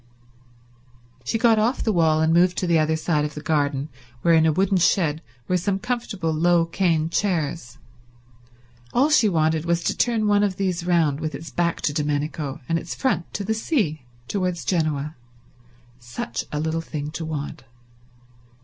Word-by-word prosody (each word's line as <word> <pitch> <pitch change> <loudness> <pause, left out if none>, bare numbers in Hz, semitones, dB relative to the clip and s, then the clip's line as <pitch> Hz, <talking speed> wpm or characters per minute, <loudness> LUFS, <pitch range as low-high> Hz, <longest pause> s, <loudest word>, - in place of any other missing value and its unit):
She 225 - 0
got 225 -1 +4
off 230 +5 +1
the 220 - +1
wall 160 -3 +3
and 160 +1 +3
moved 175 +1 +3
to - - 0
the 170 -2 +3
other 155 +1 +2
side 155 -1 0
of 150 0 -4
the - - -5
garden, 145 -2 0 0.4
where 170 - +4
in 160 0 +5
a - - +4
wooden 190 +4 +2
shed 165 -3 +2 0.3
were 180 - +2
some 190 +3 0
comfortable 205 -8 -2
low 170 +1 +3
cane 165 -2 +1
chairs. 165 - -1 1.2
All 280 +5 +3
she 235 -8 +5
wanted 160 -2 +1
was 170 0 0
to - - 0
turn 230 -3 +1
one 205 -1 +3
of 200 -2 +1
these 180 -3 -2
round 160 -5 +2
with 155 -2 -3
its 160 +4 -8
back 170 -1 -1
to 145 - 0
Domenico 150 -1 -2
and 165 0 +1
its - - -6
front 180 - -1
to 200 - -2
the 220 +3 0
sea 215 - -1 0.3
towards 180 -3 -2
Genoa. 155 -4 -1 0.8
Such 120 -1 -5
a 150 - -2
little 160 +1 -1
thing 150 -2 -5
to 160 +1 -5
want. 150 -2 -5
165 Hz, 175 wpm, -23 LUFS, 155-190 Hz, 1.2 s, in